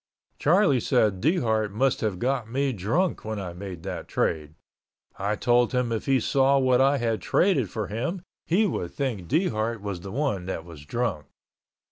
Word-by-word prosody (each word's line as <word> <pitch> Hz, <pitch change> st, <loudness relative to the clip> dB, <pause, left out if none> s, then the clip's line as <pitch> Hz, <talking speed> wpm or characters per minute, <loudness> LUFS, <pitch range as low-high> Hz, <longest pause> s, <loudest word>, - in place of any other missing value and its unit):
Charlie 165 Hz, -4 st, +4 dB
said 110 Hz, -6 st, +1 dB
Dehart 110 Hz, -, +1 dB
must 130 Hz, +6 st, +1 dB
have 105 Hz, -4 st, -1 dB
got 125 Hz, +1 st, -1 dB
me 135 Hz, +2 st, 0 dB
drunk 120 Hz, -, 0 dB
when 110 Hz, -1 st, -4 dB
I 90 Hz, -3 st, -5 dB
made 90 Hz, -2 st, -8 dB
that 95 Hz, -2 st, -5 dB
trade. 75 Hz, -1 st, -1 dB, 0.6 s
I 100 Hz, +2 st, 0 dB
told 120 Hz, +3 st, +2 dB
him 125 Hz, -2 st, 0 dB
if 115 Hz, +3 st, -3 dB
he 135 Hz, -1 st, +4 dB
saw 135 Hz, +3 st, +3 dB
what 130 Hz, -1 st, +3 dB
I 140 Hz, +1 st, +4 dB
had 115 Hz, -3 st, -1 dB
traded 150 Hz, -, +2 dB
for 110 Hz, +1 st, -3 dB
him 135 Hz, -, -3 dB, 0.2 s
he 195 Hz, +7 st, +3 dB
would 90 Hz, -, -2 dB
think 120 Hz, -, -2 dB
Dehart 115 Hz, -, 0 dB
was 100 Hz, -3 st, -5 dB
the 95 Hz, -, -8 dB
one 115 Hz, -8 st, -1 dB
that 85 Hz, -3 st, -4 dB
was 80 Hz, -4 st, -12 dB
drunk. 105 Hz, -, -2 dB
115 Hz, 175 wpm, -26 LUFS, 100-135 Hz, 0.6 s, Charlie